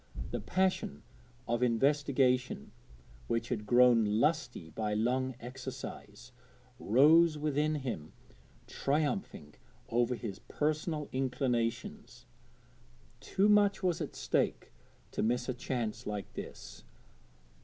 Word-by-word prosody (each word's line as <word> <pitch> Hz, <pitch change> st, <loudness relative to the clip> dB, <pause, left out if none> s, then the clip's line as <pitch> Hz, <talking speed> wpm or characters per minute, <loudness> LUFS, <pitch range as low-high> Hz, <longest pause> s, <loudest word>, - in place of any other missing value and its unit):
The -, -, -2 dB
passion 190 Hz, +2 st, -1 dB, 0.4 s
of 120 Hz, +1 st, 0 dB
investigation, 130 Hz, 0 st, +2 dB, 0.6 s
which 115 Hz, 0 st, -1 dB
had 105 Hz, -4 st, -3 dB
grown 120 Hz, -1 st, +6 dB
lusty 120 Hz, -, 0 dB
by 105 Hz, -1 st, -2 dB
long 130 Hz, +4 st, 0 dB
exercise, 125 Hz, -2 st, -8 dB, 0.5 s
rose 155 Hz, +8 st, +5 dB
within 150 Hz, +1 st, 0 dB
him 120 Hz, -, -4 dB, 0.5 s
triumphing 145 Hz, -, -2 dB, 0.4 s
over 120 Hz, +1 st, +1 dB
his 110 Hz, -5 st, -6 dB
personal 155 Hz, 0 st, -2 dB
inclinations. 125 Hz, -3 st, -2 dB, 0.9 s
Too 195 Hz, +2 st, +1 dB
much 205 Hz, -2 st, +4 dB
was 180 Hz, -3 st, +1 dB
at -, -, -5 dB
stake -, -, -1 dB, 0.4 s
to -, -, -2 dB
miss 120 Hz, +3 st, 0 dB
a 130 Hz, -, -1 dB
chance 120 Hz, -3 st, -3 dB
like 105 Hz, -1 st, -5 dB
this. -, -, -9 dB
125 Hz, 100 wpm, -32 LUFS, 115-150 Hz, 0.9 s, grown